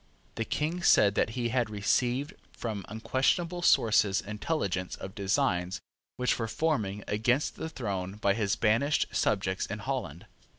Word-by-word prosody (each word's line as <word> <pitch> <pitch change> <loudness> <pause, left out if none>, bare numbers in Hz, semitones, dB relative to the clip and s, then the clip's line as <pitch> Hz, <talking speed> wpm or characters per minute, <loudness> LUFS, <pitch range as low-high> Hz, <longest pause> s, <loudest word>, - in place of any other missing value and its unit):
The 115 - -3
King 160 +8 -2
said 105 - +5
that 110 - +1
he 120 -1 0
had 120 -2 0
received 120 +6 0 0.2
from 110 -4 -4
unquestionable 135 - 0
sources 110 - +4
intelligence 100 - -2
of 95 - -8
designs 95 -3 0 0.4
which 125 0 +1
were 115 - -1
forming 110 -8 -1
against 125 +7 +1
the 160 - -5
throne 100 -10 -4
by 100 -2 +2
his 100 -2 0
banished 120 +7 +2
subjects 95 -2 0
in 105 - -4
Holland. 105 - -4
110 Hz, 140 wpm, -29 LUFS, 100-130 Hz, 0.4 s, said